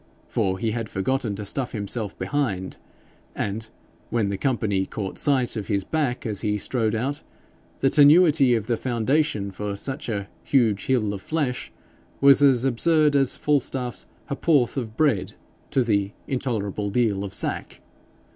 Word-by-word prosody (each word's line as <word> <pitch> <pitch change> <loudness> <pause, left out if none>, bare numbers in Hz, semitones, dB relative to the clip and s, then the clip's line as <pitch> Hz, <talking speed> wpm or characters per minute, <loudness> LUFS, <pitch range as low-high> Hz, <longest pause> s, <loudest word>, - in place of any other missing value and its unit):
For 95 -1 0
he 110 +3 -1
had 115 -1 -4
forgotten 110 +2 -1
to 105 +1 -6
stuff 125 +5 -2
himself 105 -1 -3
behind, 105 -11 -2 0.6
and, 110 +2 -3 0.4
when 110 -4 0
the 100 - -2
company 105 -7 0
caught 100 -3 -5
sight 130 -5 +2
of 105 -3 -4
his 100 -2 0
back 135 +1 -2
as 105 -4 -2
he 105 -1 0
strode 115 0 -1
out, 135 +6 -2 0.6
the 135 - +4
tenuity 150 -3 +6
of 110 -3 -2
the 120 -1 0
foundation 120 -3 0
for 100 +1 -4
such 135 +6 -3
a 100 -3 -3 0.2
'huge 115 -7 +1
hill 110 -6 +1
of 100 - -6
flesh' 145 -4 -2 0.5
was 140 -2 +6
absurd 150 +4 +3
as 135 -2 +2
Falstaff's 130 -4 -1 0.2
ha'p'orth 140 -3 +1
of 115 -5 -5
bread 140 -11 +1 0.3
to 135 -3 +2
the 100 -3 0
'intolerable 105 -6 -2
deal 105 -3 +1
of 100 - -5
sack.' - - -2
120 Hz, 150 wpm, -24 LUFS, 105-135 Hz, 0.6 s, tenuity